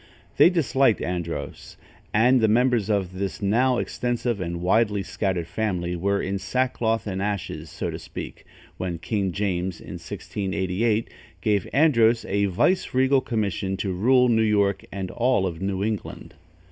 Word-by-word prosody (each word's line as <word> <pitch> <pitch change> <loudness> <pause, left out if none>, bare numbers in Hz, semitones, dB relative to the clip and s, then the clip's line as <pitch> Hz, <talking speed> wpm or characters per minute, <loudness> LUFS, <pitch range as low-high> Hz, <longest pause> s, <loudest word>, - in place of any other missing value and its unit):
They - - +8
disliked 135 - +2
Andros, 85 -2 -5 0.3
and 120 +4 +4
the 110 - +4
members 120 -1 +2
of 95 -3 -1
this 100 +2 -3
now 120 +5 +2
extensive 120 -4 -2
and 85 -1 -3
widely 105 +2 +2
scattered 95 -2 -2
family 90 -3 -2
were 100 +3 0
in 95 +1 -2
sackcloth 115 +2 0
and 95 -2 -3
ashes, 95 -6 -3
so - - -4
to - - -6
speak, - - -8 0.3
when 90 -2 -3
King 100 +2 -1
James, 90 -2 -2
in - - -8
1688, 100 +3 -2 0.3
gave 100 -2 0
Andros 120 -6 +4
a 100 +1 +1
vice 115 - +1
regal 130 +1 +4
commission 100 -5 -2
to 95 0 -2
rule 125 +7 +4
New 115 -2 +3
York 100 -3 +2
and 95 -1 -4
all 120 -5 +1
New 95 +3 -3
England. 110 -1 -4
100 Hz, 145 wpm, -24 LUFS, 95-115 Hz, 0.3 s, They